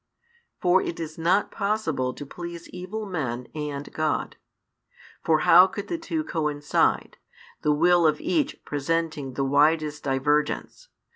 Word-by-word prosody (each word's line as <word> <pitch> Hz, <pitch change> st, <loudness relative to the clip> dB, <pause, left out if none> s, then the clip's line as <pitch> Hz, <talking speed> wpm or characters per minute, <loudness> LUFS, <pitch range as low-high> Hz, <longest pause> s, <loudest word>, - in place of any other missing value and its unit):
For 180 Hz, +1 st, +4 dB
it 170 Hz, -, -4 dB
is 160 Hz, -1 st, -6 dB
not 180 Hz, +5 st, +2 dB
possible 200 Hz, -11 st, -1 dB
to 145 Hz, -, -9 dB
please 170 Hz, +3 st, -8 dB
evil 185 Hz, +5 st, -6 dB
men 125 Hz, -, -3 dB
and 145 Hz, -2 st, -5 dB
God. 155 Hz, -2 st, -1 dB, 0.9 s
For 155 Hz, -1 st, +3 dB
how 180 Hz, +3 st, +8 dB
could 200 Hz, +2 st, -7 dB
the 340 Hz, -, -2 dB
two 330 Hz, -1 st, -2 dB
coincide, 150 Hz, -, 0 dB, 0.4 s
the 150 Hz, -, +2 dB
will 170 Hz, +2 st, +4 dB
of 155 Hz, -, +1 dB
each 305 Hz, -2 st, -1 dB
presenting 150 Hz, -2 st, -2 dB
the 135 Hz, -, 0 dB
widest 150 Hz, +2 st, +2 dB
divergence? 145 Hz, -, -1 dB
160 Hz, 135 wpm, -25 LUFS, 145-180 Hz, 0.9 s, how